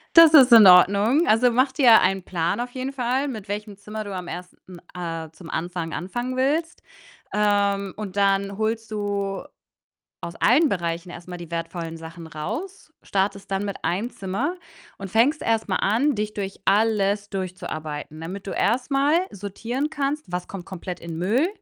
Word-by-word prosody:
Das 330 Hz, -2 st, +9 dB
ist 260 Hz, -3 st, +8 dB
in 215 Hz, -4 st, +10 dB
Ordnung. 200 Hz, -, +6 dB
Also, 245 Hz, +3 st, +4 dB
mach 260 Hz, +3 st, +2 dB
dir 250 Hz, -5 st, +6 dB
einen 190 Hz, +1 st, +1 dB
Plan 175 Hz, +2 st, -2 dB
auf 245 Hz, +1 st, -3 dB
jeden 260 Hz, +1 st, -4 dB
Fall, 260 Hz, +2 st, 0 dB
mit 220 Hz, -7 st, -6 dB
welchem 205 Hz, 0 st, -5 dB
Zimmer 215 Hz, +1 st, -6 dB
du 200 Hz, -2 st, -6 dB
am 180 Hz, -1 st, -6 dB
1. 180 Hz, +1 st, -8 dB, 0.4 s
äh, 165 Hz, -2 st, -5 dB
zum 165 Hz, 0 st, -13 dB
Anfang 170 Hz, 0 st, -3 dB
anfangen 240 Hz, +10 st, -4 dB
willst. 310 Hz, +6 st, 0 dB, 0.5 s
Ähm, 200 Hz, -2 st, +1 dB
und 205 Hz, -3 st, -6 dB
dann 200 Hz, 0 st, +1 dB
holst 220 Hz, 0 st, -2 dB
du 200 Hz, -2 st, -2 dB, 0.8 s
aus 170 Hz, -, -6 dB
allen 285 Hz, +7 st, +4 dB
Bereichen 175 Hz, -2 st, -3 dB
erst 175 Hz, 0 st, -10 dB
mal 180 Hz, -, -6 dB
die 170 Hz, -1 st, -10 dB
wertvollen 165 Hz, 0 st, -4 dB
Sachen 165 Hz, 0 st, -10 dB
raus, 315 Hz, -, -6 dB
startest 195 Hz, 0 st, -2 dB
dann 195 Hz, +1 st, -1 dB
mit 200 Hz, -, -6 dB
1 205 Hz, +8 st, -1 dB
Zimmer 235 Hz, -, -3 dB, 0.4 s
und 195 Hz, -2 st, -8 dB
fängst 250 Hz, +9 st, +3 dB
erst 225 Hz, -1 st, 0 dB
mal 185 Hz, -, 0 dB
an, 240 Hz, +8 st, +1 dB
dich 210 Hz, 0 st, -3 dB
durch 195 Hz, -2 st, -5 dB
alles 205 Hz, -1 st, +2 dB
durchzuarbeiten, 155 Hz, -6 st, -5 dB
damit 190 Hz, +5 st, -7 dB
du -, -, -3 dB
erst 245 Hz, +8 st, 0 dB
mal 280 Hz, +2 st, +3 dB, 0.2 s
sortieren 230 Hz, +8 st, -4 dB
kannst, 290 Hz, 0 st, -2 dB
was 180 Hz, 0 st, -3 dB
kommt 190 Hz, -3 st, -8 dB
komplett 185 Hz, -1 st, -7 dB
in 165 Hz, -1 st, -6 dB
Müll, 220 Hz, -, +2 dB
200 Hz, 170 wpm, -23 LUFS, 180-240 Hz, 0.8 s, in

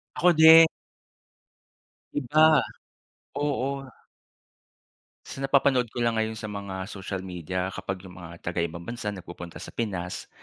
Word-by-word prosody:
Ako 180 Hz, -, +4 dB
din. 160 Hz, +1 st, +9 dB, 1.5 s
Iba. 155 Hz, +2 st, +5 dB, 0.8 s
Oo. 140 Hz, -1 st, -2 dB, 1.4 s
Sa 135 Hz, -, -8 dB
napapanood 135 Hz, -3 st, +2 dB
ko -, -, -12 dB
lang 115 Hz, -1 st, +1 dB
ngayon 110 Hz, 0 st, -2 dB
sa 110 Hz, -, -6 dB
mga 100 Hz, -2 st, -5 dB
social 95 Hz, -1 st, -6 dB
media, 90 Hz, +1 st, -4 dB
kapag 95 Hz, 0 st, -5 dB
yung 90 Hz, -1 st, -12 dB
mga 85 Hz, 0 st, -10 dB
taga-ibang 85 Hz, 0 st, -3 dB
bansa 115 Hz, -3 st, -4 dB
nagpupunta 85 Hz, -3 st, -9 dB
sa -, -, -10 dB
Pinas, 95 Hz, -6 st, -4 dB
105 Hz, 120 wpm, -26 LUFS, 90-135 Hz, 1.5 s, din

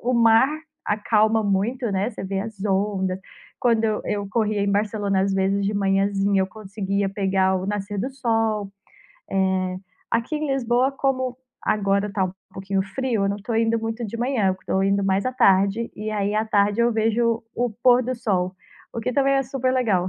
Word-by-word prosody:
o 250 Hz, +1 st, 0 dB
mar 230 Hz, +2 st, +5 dB, 0.4 s
acalma 215 Hz, +1 st, +2 dB
muito, 210 Hz, +4 st, 0 dB
né, 195 Hz, +4 st, 0 dB
você -, -, -7 dB
vê 195 Hz, 0 st, -2 dB
as 215 Hz, -1 st, -6 dB
ondas. 190 Hz, -2 st, 0 dB, 0.4 s
Quando 230 Hz, -2 st, +2 dB
eu 215 Hz, -1 st, 0 dB
eu 205 Hz, -1 st, -2 dB
corria 215 Hz, -1 st, 0 dB
em 200 Hz, -, +1 dB
Barcelona, 205 Hz, -1 st, 0 dB
às 195 Hz, 0 st, +1 dB
vezes, 195 Hz, +1 st, +1 dB
de 205 Hz, -, -1 dB
manhãzinha 195 Hz, 0 st, +2 dB
eu 190 Hz, -, +1 dB
conseguia 200 Hz, 0 st, -3 dB
pegar 190 Hz, -1 st, +1 dB
o 185 Hz, -, -3 dB
nascer 205 Hz, 0 st, -3 dB
do 260 Hz, -, -2 dB
sol. 225 Hz, -5 st, -1 dB, 0.6 s
Eh, 190 Hz, -1 st, 0 dB, 0.3 s
aqui 235 Hz, +7 st, 0 dB
em 300 Hz, 0 st, -2 dB
Lisboa, 250 Hz, 0 st, +2 dB
como 260 Hz, -2 st, -1 dB, 0.3 s
agora 200 Hz, 0 st, +1 dB
tá 190 Hz, -2 st, +1 dB
um 185 Hz, -, -3 dB, 0.2 s
pouquinho 190 Hz, 0 st, -1 dB
frio, 225 Hz, +1 st, -1 dB
eu -, -, +1 dB
não 200 Hz, -, -1 dB
tô 225 Hz, +3 st, -4 dB
indo 225 Hz, 0 st, +2 dB
muito 225 Hz, +1 st, -4 dB
de 220 Hz, -, -6 dB
manhã, 230 Hz, -6 st, +1 dB
tô 190 Hz, -, +1 dB
indo 195 Hz, 0 st, +2 dB
mais 195 Hz, +3 st, +1 dB
à 255 Hz, -, -1 dB
tarde. 200 Hz, 0 st, +3 dB
E 215 Hz, +1 st, -4 dB
aí 205 Hz, -1 st, -1 dB
à 215 Hz, +1 st, +1 dB
tarde 205 Hz, +1 st, +2 dB
eu 235 Hz, 0 st, +4 dB
vejo 225 Hz, +1 st, +1 dB
o 245 Hz, 0 st, 0 dB
pôr 245 Hz, +3 st, +4 dB
do 255 Hz, +2 st, -2 dB
sol, 190 Hz, -6 st, -1 dB, 0.4 s
o 230 Hz, -, -4 dB
que 250 Hz, -, -2 dB
também 275 Hz, 0 st, +3 dB
é 270 Hz, -, +3 dB
super 260 Hz, 0 st, -1 dB
legal. 205 Hz, -8 st, +1 dB
210 Hz, 190 wpm, -23 LUFS, 195-235 Hz, 0.6 s, mar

